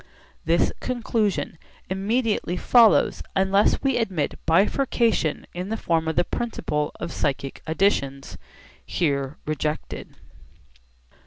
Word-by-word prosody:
This 165 +2 +2
conclusion 225 -8 -1 0.3
immediately 205 -1 0
follows 230 +3 +5
unless 195 +5 +3
we 270 -2 +2
admit 190 -11 -1
bifurcation 210 - +2
in 180 +3 -5
the 225 - -2
form 165 -5 0
of 160 - -1
the 175 - +3
principle 165 -9 -2
of 170 - -4
psychic 135 -1 -2
additions, 140 -6 0 0.5
here 140 -4 -1
rejected. 150 0 -4
180 Hz, 100 wpm, -24 LUFS, 155-220 Hz, 0.5 s, follows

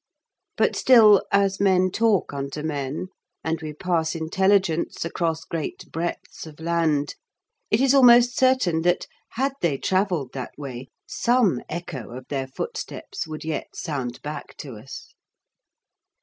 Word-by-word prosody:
But - - +2
still, 220 -6 +7
as 200 -1 +2
men 185 -2 +3
talk 215 -6 +1
unto 140 +2 -4
men, 150 +3 -3 0.3
and 160 +1 -2
we 155 -1 -5
pass 165 +1 -1
intelligence 175 +1 +1
across 165 -1 -2
great 165 -3 -5
breadths 165 0 -5
of 155 -1 -13
land, 160 -3 0 0.6
it 215 - +3
is 270 0 +4
almost 245 -2 +7
certain 255 -11 +3
that, 175 +1 +1 0.3
had 265 +3 0
they 155 -5 +1
travelled 185 -6 0
that 130 -2 -7
way, 130 -3 -7 0.2
some 240 -5 +2
echo 145 -8 -6
of 130 - -11
their 135 -2 -2
footsteps 400 - -6
would 155 -1 -7
yet 160 -1 -3
sound 130 -7 -4
back 150 0 -7
to 135 -5 -8
us. 125 +6 -11
165 Hz, 135 wpm, -24 LUFS, 150-200 Hz, 0.6 s, still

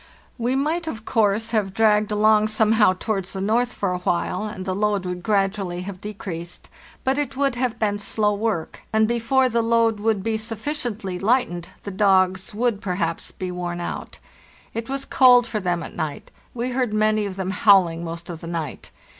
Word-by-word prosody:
"We 245 +3 0
might, 320 +5 0
of 220 -7 -5
course, 220 0 +1
have 200 -4 0
dragged 215 -1 +3
along 215 0 +4
somehow 215 -2 +4
towards 195 -1 -3
the 190 - -4
north 230 +5 +1
for 200 -5 -2
a 180 - -2
while, 180 +3 -1
and 200 -3 -6
the 190 - -1
load 205 -1 0
would 180 0 -4
gradu 200 +1 +1
ally 180 -2 -4
have 185 0 -7
decreased; 180 -5 -7 0.3
but 265 +2 +1
it 275 -2 -3
would 275 -1 +2
have 245 -1 -1
been 205 -2 0
slow 210 +1 +1
work, 205 -5 -2
and 220 0 +3
before 240 +3 +2
the 235 -1 +1
load 230 -1 +2
would 210 -2 0
be 225 0 0
sufficiently 220 -4 -3
lightened 195 -6 +1
the 200 - -5
dogs 190 0 +2
would 225 -1 0
perhaps 175 -3 -2
be 185 -1 -5
worn 175 -1 -4
out. 175 - -5 0.6
It 230 +1 -5
was 275 0 -3
cold 250 -2 +6
for 225 -2 -3
them 175 -3 -1
at - - -8
night; 155 -2 -4 0.2
we 245 +1 -2
heard 245 -4 0
many 215 -1 +2
of 190 - -6
them 190 -1 -3
howling 185 -5 +4
most 170 0 -6
of 170 -2 -7
the 170 - -7
night. 165 -5 -5
210 Hz, 190 wpm, -23 LUFS, 185-230 Hz, 0.6 s, cold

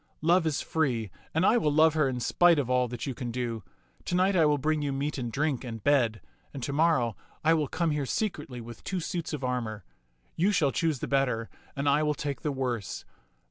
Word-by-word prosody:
" - - -42
Love 175 -2 +4
is 155 - 0
free, 120 - -1 0.2
and 160 +4 +1
I 230 - +5
will 150 -8 +1
love 155 +1 +5
her 155 -4 +2
in 125 -1 -3
spite 170 +7 +4
of 130 -3 0
all 125 0 +3
that 120 -1 -5
you 135 - -3
can 120 0 -5
do. 120 -2 -3 0.4
To 180 - -1
night 190 +2 +3
I 165 -4 +5
will 150 -1 +3
bring 155 +2 0
you 145 -1 -1
meat 140 +2 -2
and 120 -2 -3
drink 145 0 -1
and 115 -4 -7
bed, 125 -7 +2 0.3
and 135 - -5
to 140 - -2
morrow 140 -8 +2 0.3
I 160 +1 +5
will 155 -3 +1
come 170 +1 0
here 145 -2 -1
secretly 150 - -3
with 115 -1 -10
two 190 - -2
suits 170 -1 -3
of 150 -4 -4
armor. 120 -4 -2 0.5
You 190 +5 +2
shall 160 -9 +2
choose 160 -5 0
the - - -2
better 125 -5 0 0.2
and 140 +1 -2
I 145 +2 +4
will 150 -1 +1
take 145 -2 -4
the 150 - -1
worse. 125 -6 -3
140 Hz, 230 wpm, -28 LUFS, 125-160 Hz, 0.5 s, I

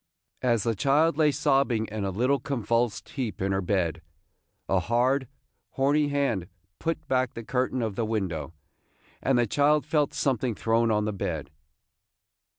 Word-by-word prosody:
As 120 -4 +2
the 115 - +1
child 145 +8 +3
lay 155 -1 +4
sobbing 135 -5 +2
in 110 -1 -3
a - - -1
little 125 +8 +1
convulsed 115 -3 -1
heap 125 -6 -4
in 95 +1 0
her 95 0 +1
bed, 85 -4 0 0.7
a 95 - +2
hard, 125 +7 +1 0.5
horny 145 +2 +2
hand 140 -11 0 0.3
put 160 -2 -3
back 130 -3 0
the 115 - -6
curtain 130 +2 -1
of 110 -3 -2
the 115 - -1
window, 95 -9 -2 0.7
and 135 -2 +2
the 120 - +3
child 145 +6 +2
felt 150 -2 +1
something 125 -3 0
thrown 115 +2 +1
on 105 -1 +1
the 105 - -1
bed. 100 - -4
120 Hz, 155 wpm, -27 LUFS, 105-140 Hz, 0.7 s, lay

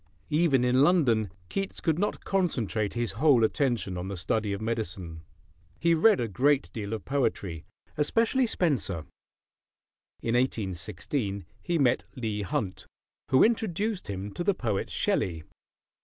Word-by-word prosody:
Even 150 -5 +3
in 125 +1 +3
London, 130 - +3 0.2
Keats 195 - -3
could 160 -1 0
not 205 - -1
concentrate 120 - 0
his 120 -3 -1
whole 125 +2 +4
attention 110 -6 0
on 90 - -4
the 100 -1 -4
study 105 +4 0
of 100 - -2
medicine. 95 -7 -4 0.6
He 170 0 +3
read 195 +5 +5
a 120 - 0
great 130 - +1
deal 105 -1 -4
of 110 - -5
poetry, 100 - -1 0.3
especially 230 - +2
Spenser. 125 - 0 1.2
In 115 - 0
1816 100 - -2 0.2
he 175 -2 0
met 130 -4 +3
Leigh 110 -4 -2
Hunt, 95 -1 -3 0.4
who 130 - +6
introduced 215 -2 0
him 100 0 -5
to 175 - -4
the 200 +1 +2
poet 110 - -2
Shelley. 80 -4 0
120 Hz, 140 wpm, -28 LUFS, 100-160 Hz, 1.2 s, who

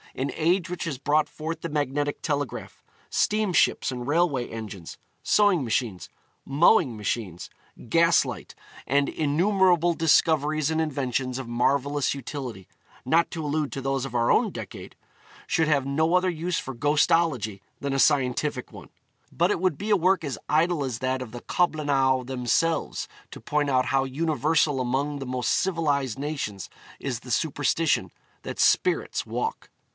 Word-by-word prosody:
An 135 +2 -2
age 170 +2 +1
which 180 - -4
has 150 -5 -3
brought 150 +3 +1
forth 160 +1 -5
the 170 - -4
magnetic 145 -1 -1
telegraph, 145 -3 -3 0.3
steamships 210 -9 +2
and 125 -1 -5
railway 145 -5 +1
engines, 105 -6 -8 0.3
sewing 205 -7 +3
machines, 110 -5 -2 0.3
mowing 140 - +3
machines, 105 -4 -4 0.4
gas 165 +4 +4
light, - - -7 0.3
and 140 +1 +2
innumerable 175 +2 +2
discoveries 155 -2 +2
and 160 0 0
inventions 130 -4 -2
of 130 - -6
marvellous 140 +4 +1
utility 130 -7 -7 0.4
not 165 +6 +2
to 160 -3 -4
allude 150 0 -1
to - - -4
those 135 -1 -1
of 135 -3 -6
our 120 0 +2
own - - +3
decade - - -9 0.5
should 160 -2 +1
have 140 -3 +2
no 160 +5 +1
other 180 0 +3
use 170 +1 -2
for 135 - -7
ghostology 145 - +1 0.2
than 140 0 -2
a 135 - 0
scientific 130 -2 +1
one. 90 -8 -11 0.4
But 175 +4 +1
it 175 - -1
would 185 -6 +1
be 210 +5 -3
a - - +6
work 185 0 +2
as 140 - -4
idle 160 0 +2
as 125 -4 -3
that 130 0 -1
of 125 -4 -7
the 120 +1 -8
Coblynau 140 -6 +1
themselves, 130 +6 0 0.2
to - - -10
point 145 -1 -1
out 130 -1 +2
how 135 +2 +1
universal 150 0 +1
among 140 +4 -1
the 135 - -6
most 125 -2 -1
civilised 145 - 0
nations 140 - -4 0.3
is 125 -4 -3
the 125 +1 -10
superstition 160 +2 +1 0.3
that - - -7
spirits 365 - +2
walk. 450 +2 -3
145 Hz, 155 wpm, -25 LUFS, 130-165 Hz, 0.5 s, a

